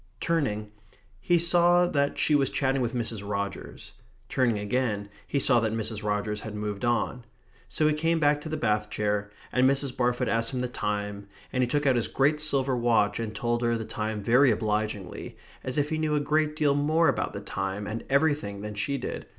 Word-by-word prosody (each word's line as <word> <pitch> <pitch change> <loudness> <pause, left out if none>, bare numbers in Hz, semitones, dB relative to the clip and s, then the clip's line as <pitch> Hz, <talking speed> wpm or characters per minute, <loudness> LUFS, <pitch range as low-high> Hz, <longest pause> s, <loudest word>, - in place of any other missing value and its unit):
Turning, 110 -11 -1 0.5
he 175 - +2
saw 175 +1 +4
that 140 -4 0
she 155 - +2
was 140 -3 +3
chatting 135 -1 0
with 120 0 -2
Mrs. 115 -3 -2
Rogers. 100 -1 -5 0.4
Turning 125 -5 +1
again, 105 -1 -1 0.2
he - - -1
saw 125 -3 +4
that 110 -1 -1
Mrs. 110 -1 -2
Rogers 105 0 -1
had 105 0 -7
moved 105 0 -4
on. 120 +1 0 0.5
So 155 - 0
he 155 - +3
came 165 +2 +1
back 145 -1 +3
to 155 - -7
the 155 - -2
bath 105 -6 0
chair, 105 -1 -1 0.2
and 130 +1 +4
Mrs. 135 -1 0
Barfoot 125 0 0
asked 115 +3 0
him 125 - -1
the 125 - -1
time, 105 -3 -3 0.3
and 130 - +1
he 125 - +2
took 145 +4 0
out 135 -2 +4
his 115 - 0
great 150 +3 +1
silver 135 -3 +1
watch 115 -4 +2
and 110 -2 -4
told 120 +2 -1
her 120 -1 +1
the 110 - -5
time 110 -1 -4
very 125 +5 +5
obligingly, 105 -3 -2 0.3
as 130 +1 -4
if 145 0 +1
he 155 - -1
knew 155 -1 +1
a - - +2
great 150 +1 +1
deal 150 -3 +2
more 155 +4 +2
about 135 -5 0
the - - -4
time 95 +2 -4
and 110 +3 -4
everything 140 -8 +1
than 105 0 -5
she 140 +8 -2
did. - - -5
120 Hz, 205 wpm, -27 LUFS, 105-145 Hz, 0.5 s, very